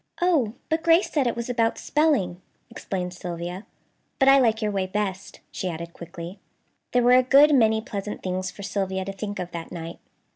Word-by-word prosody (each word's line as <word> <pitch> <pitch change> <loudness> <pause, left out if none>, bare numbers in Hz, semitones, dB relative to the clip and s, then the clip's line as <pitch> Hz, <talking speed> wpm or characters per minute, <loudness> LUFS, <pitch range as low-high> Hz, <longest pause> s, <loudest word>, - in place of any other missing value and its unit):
"Oh! 315 -12 +2
But 320 +1 0
Grace 335 +2 +4
said 280 -5 +1
it 235 - -1
was 235 0 -4
about 230 -2 +1
spelling," 280 - +1 0.3
explained 180 -2 -4
Sylvia; 175 +2 -6 0.5
"but 265 - +3
I 275 0 +8
like 225 -4 +3
your 215 -2 -1
way 195 -2 -1
best," 195 -1 -4
she 185 - -3
added 170 0 -6
quickly. 170 +2 -9 0.5
There 245 -1 +3
were 245 - +5
a 255 - +7
good 280 +4 +6
many 220 -4 +4
pleasant 210 -1 -6
things 185 0 -2
for 200 - -10
Sylvia 190 -1 -2
to 195 - -5
think 205 +1 -5
of 180 -1 -5
that 165 -1 -7
night. 165 -1 -7
205 Hz, 190 wpm, -25 LUFS, 180-250 Hz, 0.5 s, I